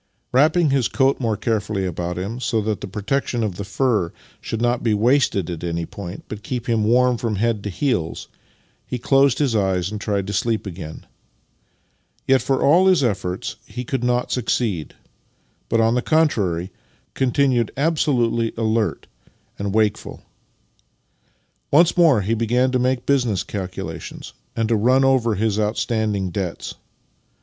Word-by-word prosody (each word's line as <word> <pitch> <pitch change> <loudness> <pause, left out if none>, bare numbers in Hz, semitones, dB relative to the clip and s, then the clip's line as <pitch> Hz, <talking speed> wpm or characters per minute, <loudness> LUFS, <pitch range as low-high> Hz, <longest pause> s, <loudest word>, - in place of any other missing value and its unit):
Wrapping 155 +4 +4
his 135 -4 +2
coat 135 0 +1
more 115 -4 -1
carefully 105 -3 -1
about 90 0 -3
him, 100 +7 -4
so 115 -3 0
that 105 -1 -2
the - - -5
protection 115 +4 -2
of 100 -5 -3
the 100 - -4
fur 105 -4 0 0.3
should 115 - -4
not 120 +1 +1
be 110 -3 +1
wasted 115 - +2
at 85 -2 -6
an}' 85 -1 -2
point, 95 0 -8
but 105 -1 -7
keep 120 +2 -4
him 115 -2 +1
warm 125 +2 +3
from 115 -3 -1
head 110 +1 0
to 105 - -3
heels, 95 - -2 0.6
he 125 - -3
closed 135 +1 +3
his 135 -6 +1
eyes 95 -2 0
and 105 -1 -5
tried 100 -3 -1
to 100 - -4
sleep 115 -1 0
again. 85 -4 -8 1.2
Yet, 135 0 +4
for 135 -1 0
all 175 +7 +5
his 185 -6 +4
efforts, 95 -5 -2
he 125 +4 -6
could 125 0 -3
not 125 0 0
succeed, 110 -8 -1 0.7
but, 115 - +2
on 115 0 +3
the 125 - +1
con 160 +4 +3
trary, 90 - -2 0.4
continued 130 -3 +1
absolutely 125 -7 +1
alert 110 -5 0 0.5
and 100 0 -2
wakeful. 105 0 -1 1.5
Once 170 +4 +4
more 160 -11 +5
he 105 +4 -1
began 120 +3 +1
to 130 - +1
make 125 0 0
business 120 -9 +1
calculations 95 -3 -6 0.2
and 115 -1 0
to 115 - +2
run 125 +5 +3
over 125 -4 +2
his 105 +1 0
outstanding 105 -3 -1
debts. 90 -2 -4
115 Hz, 160 wpm, -21 LUFS, 100-130 Hz, 1.5 s, all